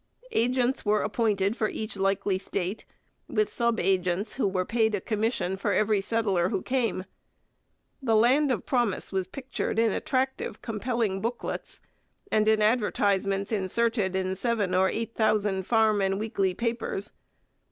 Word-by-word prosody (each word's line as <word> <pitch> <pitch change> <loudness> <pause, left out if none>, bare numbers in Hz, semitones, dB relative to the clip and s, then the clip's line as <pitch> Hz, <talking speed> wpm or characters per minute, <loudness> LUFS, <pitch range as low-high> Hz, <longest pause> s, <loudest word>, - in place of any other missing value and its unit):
Agents 250 - +1
were 210 0 +2
appointed 210 -2 +1
for 215 -3 0
each 215 -1 -4
likely 195 0 0
state, 195 +1 -3 0.4
with 430 -1 0
sub 235 -2 +1
agents 185 +2 0
who 260 - 0
were 185 -1 0
paid 220 -1 +1
a - - -2
commission 215 -3 -1
for - - 0
every 215 -1 +2
settler 195 -5 +1
who 195 -4 -2
came. 240 -7 -1 1.0
The 230 -4 +2
land 260 +6 +4
of 245 - -2
promise 240 -7 0
was 190 -2 -1
pictured 260 +2 -4
in 225 -1 +3
attractive, 265 +4 -1
compelling 225 -3 -1
booklets, 235 +2 -4 0.5
and 215 0 +3
in 220 -1 +4
advertisements 200 -3 +1
inserted 210 0 0
in 190 0 -1
seven 210 -3 0
or 190 +1 +4
eight 230 +1 -3
thousand 205 -4 +1
farm 220 -3 +3
and 195 0 +1
weekly 200 -4 0
papers. 230 -3 -2
215 Hz, 145 wpm, -27 LUFS, 195-230 Hz, 1.0 s, land